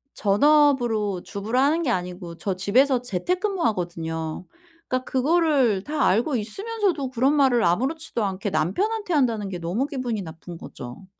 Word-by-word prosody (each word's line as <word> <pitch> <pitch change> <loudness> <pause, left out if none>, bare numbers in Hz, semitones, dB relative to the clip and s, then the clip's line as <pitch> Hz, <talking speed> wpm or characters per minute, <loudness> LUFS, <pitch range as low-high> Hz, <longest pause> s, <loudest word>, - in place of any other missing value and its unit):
전업으로 230 -4 +3
주부를 220 +4 -2
하는 305 +5 +2
게 285 - 0
아니고 180 -3 -4
저 190 +2 -2
집에서 245 +7 +2
재택근무 360 - -2
하거든요. 165 -4 -3 0.4
그러니까 255 0 -1
그거를 270 - +2
다 305 +5 0
알고 240 +9 +2
있으면서도 380 - -2
그런 260 +3 +2
말을 260 -5 +3
아무렇지도 260 - 0
않게 195 0 -2
남편한테 400 - -1
한다는 230 -9 +1
게 180 - -5
너무 180 +10 -1
기분이 245 -7 -3
나쁜 165 +1 -9
거죠. 125 +4 -10
235 Hz, 365 characters per minute, -24 LUFS, 185-290 Hz, 0.4 s, 전업으로